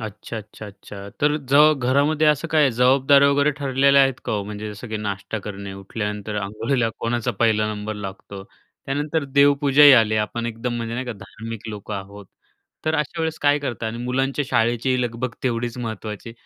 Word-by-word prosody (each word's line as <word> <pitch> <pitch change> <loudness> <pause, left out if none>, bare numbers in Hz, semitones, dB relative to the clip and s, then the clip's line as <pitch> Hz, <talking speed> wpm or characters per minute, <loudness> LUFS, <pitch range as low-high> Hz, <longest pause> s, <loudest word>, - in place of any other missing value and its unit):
अच्छा, 110 +1 -7
अच्छा, 110 0 -9
अच्छा. 100 0 -11
तर 150 +1 +3
जव 150 +3 +6
घरामध्ये 140 +4 +2
असं 150 +2 +2
काय 150 -4 +3
जबाबदाऱ्या 135 +3 +4
वगैरे 145 +1 +3
ठरलेल्या 140 0 +4
आहेत 135 -1 0
का - - -2
ओ? 105 -2 -1
म्हणजे 105 +1 -6
जसं 110 +3 -10
की, 110 - -3
नाश्ता 105 +1 -4
करणे 100 -1 -7
उठल्यानंतर 105 +1 -5
अंघोळीला 115 +4 -1
कोणाचा 120 0 -1
पहिला 110 -2 +2
नंबर 105 +1 -5
लागतो 100 -1 -8
त्यानंतर 145 +7 -5
देवपूजाही 140 +1 +5
आली 110 -3 +4
आपण 115 +2 -2
एकदम 120 +1 -4
म्हणजे 115 0 -4
नाही 130 +1 -4
का 120 - -3
धार्मिक 110 +2 -9
लोकं 105 0 -6
आहोत. 100 +1 -8 0.6
तर 155 0 +1
अशा 155 +2 -2
वेळेस 160 0 -2
काय 145 0 +4
करता 120 -5 -4
आणि 110 +1 -5
मुलांच्या 135 +3 -1
शाळेची 120 +3 +1
लगबग 120 +1 -3
तेवढीच 120 -1 -2
महत्त्वाची 110 -1 -6
120 Hz, 170 wpm, -22 LUFS, 105-140 Hz, 0.6 s, जव